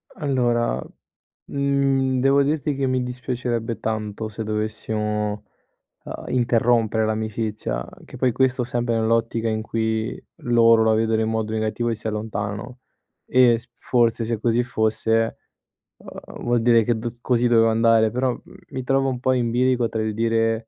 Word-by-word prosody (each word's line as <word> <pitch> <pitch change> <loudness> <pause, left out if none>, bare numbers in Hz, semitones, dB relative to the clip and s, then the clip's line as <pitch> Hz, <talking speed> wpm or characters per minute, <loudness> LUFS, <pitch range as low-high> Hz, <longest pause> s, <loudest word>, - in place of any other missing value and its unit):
Allora, 125 - 0 0.6
mhmm, 135 -2 +1
devo 135 +2 +4
dirti 150 0 -1
che 135 0 -1
mi 130 0 +1
dispiacerebbe 125 -2 -3
tanto 110 -1 -3
se 110 +1 -6
dovessimo, 105 0 -2 0.7
uhm, - - -7
interrompere 115 -2 +2
l'amicizia, 110 - -2 0.2
che - - -12
poi 125 0 +2
questo 130 +1 +1
sempre 120 0 -1
nell'ottica 115 0 0
in 110 0 -1
cui 110 0 -2 0.2
loro 115 -2 +5
la 110 - +3
vedono 110 0 +1
in 110 - 0
modo 110 -1 -2
negativo 110 +2 -1
e 115 - 0
si 110 - -10
allontanano. 105 +2 -4 0.5
E 125 -2 +4
s 120 +2 -17
forse, 120 -2 +1
se 115 0 -2
così 115 +2 +1
fosse, 115 -1 0 0.6
uhm, - - -11
vuol 120 -1 +1
dire 115 -1 +4
che 115 +1 0
d 115 +1 -5
così 120 -1 +2
dove 115 -1 +4
andare. 115 -1 +3
Però, 125 +1 0
mhmm, 120 - -11
mi 130 - -5
trovo 135 +1 +1
un 125 -2 -3
po' 130 - +1
in 120 -2 0
bilico 125 0 +1
tra 110 - -2
il 110 0 -2
dire 115 0 0
115 Hz, 155 wpm, -22 LUFS, 110-125 Hz, 0.7 s, loro